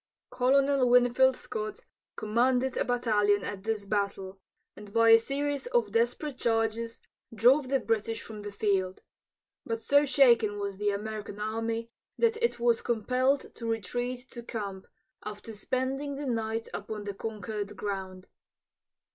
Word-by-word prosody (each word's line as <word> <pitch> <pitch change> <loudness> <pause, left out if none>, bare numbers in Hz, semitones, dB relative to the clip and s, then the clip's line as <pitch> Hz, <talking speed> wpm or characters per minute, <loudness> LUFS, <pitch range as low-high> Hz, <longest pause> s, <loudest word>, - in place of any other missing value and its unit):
Colonel 265 +1 +3
Winfield 250 +1 +5
Scott 215 -3 -5 0.3
commanded 250 +4 +1
a - - +1
battalion 210 -5 +2
at 200 -2 -5
this 215 -1 -2
battle, 195 -2 -2 0.4
and 205 -1 -11
by 230 +1 +4
a 225 - +9
series 280 +3 -2
of 230 -4 +1
desperate 245 +5 0
charges 230 0 0 0.3
drove 255 +5 +4
the 270 0 +2
British 225 -1 -1
from 215 -2 -9
the 205 0 -6
field. 195 -2 -1 0.6
But 230 0 -3
so 285 +5 +4
shaken 235 -7 +4
was 200 -1 -4
the 205 +1 +1
American 210 0 -4
army 225 +2 -2 0.3
that 455 -1 +2
it 470 - +1
was 235 -1 +2
compelled 255 +4 0
to 230 - -6
retreat 245 +3 -2
to 240 - -7
camp, 200 -5 -6 0.4
after 210 +2 -7
spending 260 +6 -2
the 285 +1 -5
night 225 -2 -2
upon 210 0 -5
the 205 0 -4
conquered 210 0 -5
ground. 190 -2 -5
225 Hz, 140 wpm, -29 LUFS, 205-250 Hz, 0.6 s, a